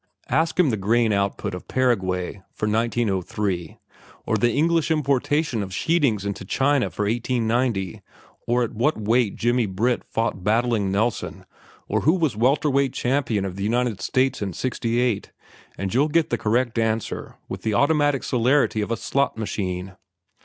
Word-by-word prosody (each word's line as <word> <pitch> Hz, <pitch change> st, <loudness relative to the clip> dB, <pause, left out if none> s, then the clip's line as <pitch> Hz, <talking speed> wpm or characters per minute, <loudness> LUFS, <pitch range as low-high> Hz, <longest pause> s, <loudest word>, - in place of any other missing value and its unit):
Ask 160 Hz, +3 st, +1 dB
him 160 Hz, -7 st, +5 dB
the 110 Hz, -, -1 dB
grain 110 Hz, +3 st, +2 dB
output 100 Hz, -2 st, -1 dB
of 90 Hz, -, -7 dB
Paraguay 95 Hz, -7 st, 0 dB
for 110 Hz, -, -2 dB
1903, 105 Hz, -5 st, -1 dB, 0.5 s
or -, -, +1 dB
the 120 Hz, 0 st, +2 dB
English 165 Hz, +4 st, +2 dB
importation 145 Hz, -3 st, +1 dB
of 95 Hz, -2 st, -5 dB
sheetings 125 Hz, -, +1 dB
into 100 Hz, -1 st, -4 dB
China 135 Hz, +7 st, +1 dB
for 105 Hz, -, -3 dB
1890, 115 Hz, -3 st, 0 dB, 0.5 s
or 120 Hz, +1 st, +2 dB
at 115 Hz, -, -4 dB
what 135 Hz, +8 st, +1 dB
weight 110 Hz, 0 st, +1 dB
Jimmy 120 Hz, -1 st, +1 dB
Britt 115 Hz, +6 st, 0 dB
fought 115 Hz, -5 st, -2 dB
Battling 110 Hz, -1 st, +1 dB
Nelson, 110 Hz, +4 st, -1 dB, 0.4 s
or -, -, 0 dB
who 160 Hz, -, +4 dB
was 160 Hz, -, 0 dB
welter 135 Hz, +7 st, +2 dB
weight 135 Hz, -1 st, +1 dB
champion 120 Hz, -6 st, 0 dB
of 95 Hz, -1 st, -5 dB
the 100 Hz, -, -3 dB
United 115 Hz, -2 st, 0 dB
States 130 Hz, +5 st, +1 dB
in 100 Hz, -3 st, -3 dB
'68, 120 Hz, -1 st, -1 dB, 0.5 s
and 95 Hz, +2 st, -3 dB
you'll 140 Hz, +5 st, +3 dB
get 160 Hz, +1 st, +1 dB
the -, -, +3 dB
correct 115 Hz, +1 st, +1 dB
answer 110 Hz, -1 st, -2 dB
with -, -, -6 dB
the 110 Hz, -2 st, -1 dB
automatic 145 Hz, 0 st, +2 dB
celerity 125 Hz, -2 st, +2 dB
of 105 Hz, -, -3 dB
a 115 Hz, -, -1 dB
slot 140 Hz, -4 st, 0 dB
machine. 95 Hz, -3 st, -3 dB
115 Hz, 160 wpm, -23 LUFS, 100-130 Hz, 0.5 s, him